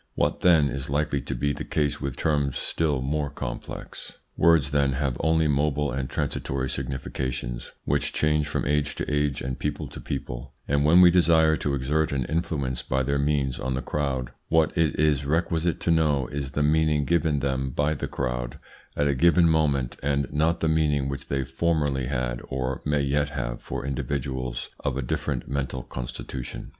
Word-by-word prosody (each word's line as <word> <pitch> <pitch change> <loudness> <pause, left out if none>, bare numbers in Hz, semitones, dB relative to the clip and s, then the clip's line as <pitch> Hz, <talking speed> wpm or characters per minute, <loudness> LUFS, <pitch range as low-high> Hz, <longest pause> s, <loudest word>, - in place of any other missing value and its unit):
What, - - +1
then, 80 -5 +5
is 70 0 -4
likely 70 0 0
to - - -4
be 70 +4 0
the - - -5
case 75 -3 -1
with 70 -3 -3
terms 70 -4 +1
still 75 -5 0
more 75 +1 -1
complex? 70 - -7 0.2
Words, 80 -4 +4
then, 70 -2 +2
have 70 -2 -1
only 80 0 +3
mobile 75 0 +1
and 65 0 -3
transitory 65 -1 -2
significations 65 -2 -4
which 70 0 +1
change 75 0 +1
from 75 - -2
age 75 -1 +1
to - - -3
age 75 -1 +1
and 65 0 -4
people 75 0 -2
to - - -9
people; 65 -1 -5
and 70 0 +2
when 85 +5 +7
we 90 -1 +8
desire 80 -3 +5
to 70 -1 -1
exert 75 +4 0
an 65 -3 -1
influence 75 -6 -1
by 65 +1 0
their 70 +2 0
means 70 -3 0
on 65 0 -2
the 65 - -2
crowd 70 -4 -2 0.2
what 80 -1 +3
it 80 -4 +1
is 75 -3 +3
requisite 80 +3 0
to 85 - +2
know 75 -5 +3
is 70 -1 -4
the 75 - +1
meaning 75 -1 +3
given 80 -2 +2
them 65 -1 -1
by 75 +4 +1
the - - -4
crowd - - -3 0.4
at 75 - +2
a 70 - +2
given 85 +5 +5
moment, 70 -6 +1
and 70 0 +1
not 80 +3 +1
the 80 - +2
meaning 75 -3 +2
which 70 0 -5
they 70 -1 0
formerly 70 -1 0
had - - -2
or 65 0 -2
may 75 -1 +2
yet 70 +1 +1
have - - -4
for - - -5
individuals 65 -2 -3
of 65 -2 -2
a 70 - -1
different - - -2
mental 65 -2 -3
constitution. 65 0 -6
70 Hz, 185 wpm, -26 LUFS, 65-75 Hz, 0.4 s, we